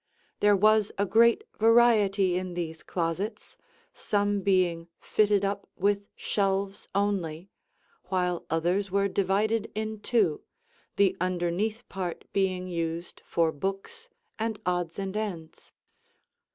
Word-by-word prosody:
There 205 0 +5
was 215 +1 +4
a 200 - +2
great 235 - +4 0.2
variety 215 -5 +4
in 180 -1 -3
these 160 -2 -4
closets, 175 +5 -3 0.4
some 205 -1 0
being 180 -3 +1
fitted 205 -2 +2
up 200 0 -3
with 200 +1 0
shelves 195 0 -1
only, 190 -4 -1 0.5
while 180 -2 -1
others 175 +5 0
were 200 +1 +2
divided 200 +3 0
in 215 0 -3
two, 205 -8 +1 0.5
the 195 -2 +3
underneath 185 +6 -1
part 185 -3 -5
being 185 -2 0
used 170 -1 -4
for 165 -1 +2
books 195 - -5 0.3
and 220 -1 -2
odds 175 -2 -1
and 195 0 -4
ends. 185 -7 -5
195 Hz, 115 wpm, -28 LUFS, 180-205 Hz, 0.5 s, There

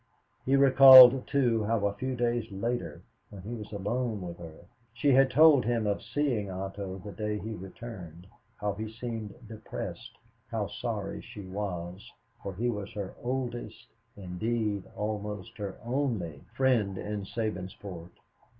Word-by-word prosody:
He 135 - +4
recalled, 130 -2 +9
too, 120 -6 +2
how 110 -1 +1
a 100 - +1
few 130 +5 -3
days 120 -2 -1
later, 100 -6 -3 0.3
when 95 -3 -11
he 110 +4 -6
was 105 -3 -7
alone 110 +2 -2
with 85 -1 -7
her, 85 0 -11 0.3
she 140 +5 +2
had 135 +1 +5
told 145 0 +6
him 115 -1 0
of 100 -1 0
seeing 125 -9 -1
Otto 95 0 -5
the 105 - -6
day 105 +3 -3
he 110 +2 -5
returned; 95 -4 -9 0.3
how 105 -1 -2
he 110 +2 -5
seemed 115 -2 -6
depressed, 115 +1 -7 0.3
how 110 -3 -1
sorry 105 -2 -4
she 105 - -10
was, 95 -1 -5 0.3
for 100 -2 -6
he 120 +6 -1
was 105 -3 -3
her 100 -3 -5
oldest, 125 -1 -4 0.3
indeed 105 +2 -2
almost 105 +1 -4
her 100 -2 -5
only, 115 - -2
friend 120 -7 +2
in 105 +1 -4
Sabinsport. 95 -4 -5
105 Hz, 145 wpm, -29 LUFS, 100-120 Hz, 0.3 s, recalled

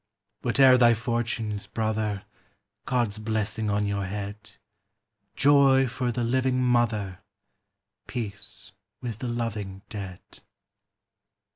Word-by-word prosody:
Whate'er 130 -2 +5
thy 120 -1 +6
fortunes, 115 -2 -2
brother! 110 -3 -1 0.6
God's 120 -4 0
blessing 110 0 -1
on 105 0 +1
your 100 -1 -1
head; 105 +2 -6 0.8
Joy 140 -2 +5
for 125 0 -2
the 120 0 -2
living 130 +2 +1
mother, 115 -7 +1 0.9
Peace 105 -4 -7 0.3
with 115 -4 -5
the 125 - -3
loving 105 -5 -4
dead. 95 -4 -7
110 Hz, 100 wpm, -26 LUFS, 105-120 Hz, 0.9 s, thy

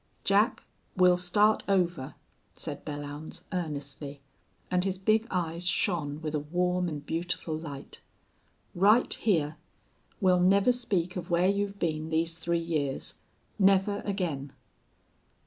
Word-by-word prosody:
"Jack, 205 +5 +2 0.3
we'll 180 -1 +6
start 205 +5 +3
over," 175 -8 0 0.4
said - - -6
Belllounds, 145 +1 -6
earnestly, 145 -4 -4 0.5
and 180 0 +2
his 190 -1 -1
big 215 +4 +2
eyes 175 -1 -2
shone 155 -6 +1
with 155 -1 -3
a 150 - +1
warm 180 +4 0
and 145 -2 -6
beautiful 165 -1 -2
light. 145 -3 -8 0.7
"Right 210 +7 +4
hyar. 160 -7 0 0.6
We'll 185 -3 +4
never 195 +6 +5
speak 195 -8 -1
of 175 -1 -5
where 175 +1 +3
you've 200 0 -1
been 155 -3 -2
these 165 +1 -1
three 170 +1 0
years. 155 -5 -2 0.4
Never 195 +1 +4
again!" 165 -9 -3
175 Hz, 125 wpm, -29 LUFS, 155-195 Hz, 0.7 s, we'll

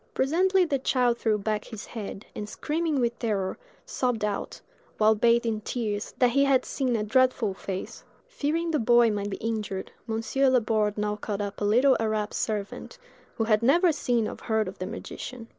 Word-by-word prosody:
Presently 365 +7 +3
the 280 -5 0
child 250 -2 +1
threw 220 -2 +1
back 210 +1 -2
his 220 -2 -8
head, 210 -2 -7
and 210 0 -5
screaming 310 +3 -1
with 235 -1 0
terror, 205 - -1 0.3
sobbed 245 -5 -1
out, 205 -1 -4 0.4
while 215 0 +5
bathed 235 +2 +3
in 220 -2 -1
tears, 210 -2 -3
that 250 -2 +4
he 275 +3 +3
had 270 -2 +3
seen 255 -3 -1
a 215 - 0
dreadful 250 -2 +2
face. 190 0 -6 0.2
Fearing 330 -7 -1
the 305 - +1
boy 235 0 +5
might 205 -1 -2
be 195 - -4
injured, 210 -4 -3 0.2
Monsieur 225 +5 +1
Laborde 220 -4 +1
now 210 0 -1
called 205 -1 -4
up 200 0 -6
a - - +1
little 250 +6 +5
Arab 215 -1 -1
servant, 210 - -3 0.4
who 225 - 0
had 215 -1 +2
never 335 +9 +4
seen 240 -7 0
or - - -6
heard 220 -2 0
of 185 - -8
the 185 - -3
magician. 235 -3 -7
225 Hz, 185 wpm, -27 LUFS, 210-260 Hz, 0.4 s, while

